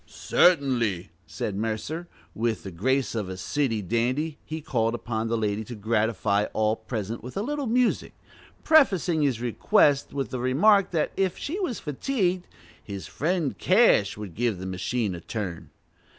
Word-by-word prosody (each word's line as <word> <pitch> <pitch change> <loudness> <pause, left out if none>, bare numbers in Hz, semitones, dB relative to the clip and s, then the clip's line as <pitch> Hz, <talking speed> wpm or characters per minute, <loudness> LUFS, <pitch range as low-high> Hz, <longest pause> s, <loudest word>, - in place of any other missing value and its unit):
"Certainly," 125 - +2 0.2
said 100 - -4
Mercer 110 +7 -2
and 175 +1 -9 0.3
with 115 -1 -1
the 95 - -7
grace 130 +10 0
of 105 -5 -3
a 95 - -6
city 115 +1 -1
dandy 130 - -1
he 160 +1 -5
called 115 -6 0
upon 115 -1 -3
the 115 +1 0
lady 105 0 -1
to 120 - -7
gratify 105 -1 +1
all 110 0 +2
present 110 -1 -5
with 125 +7 -8
a 200 - 0
little 290 +1 -2
music, 245 +2 +1 0.5
prefacing 190 - +4
his 135 -6 +1
request 140 - +2
with 140 -1 -3
the 130 - -3
remark 180 - +4
that 165 -4 0
if 190 -2 0
she 340 +8 -4
was 320 - -2
fatigued 180 - -1 0.4
"his 100 -2 -7
friend 165 -1 -1
Cash 185 - +4
would 105 -5 -7
give 115 +1 0
the 95 - -7
machine 95 +3 -2
a 85 - -7
turn." 95 -4 -5
120 Hz, 165 wpm, -26 LUFS, 105-165 Hz, 0.5 s, prefacing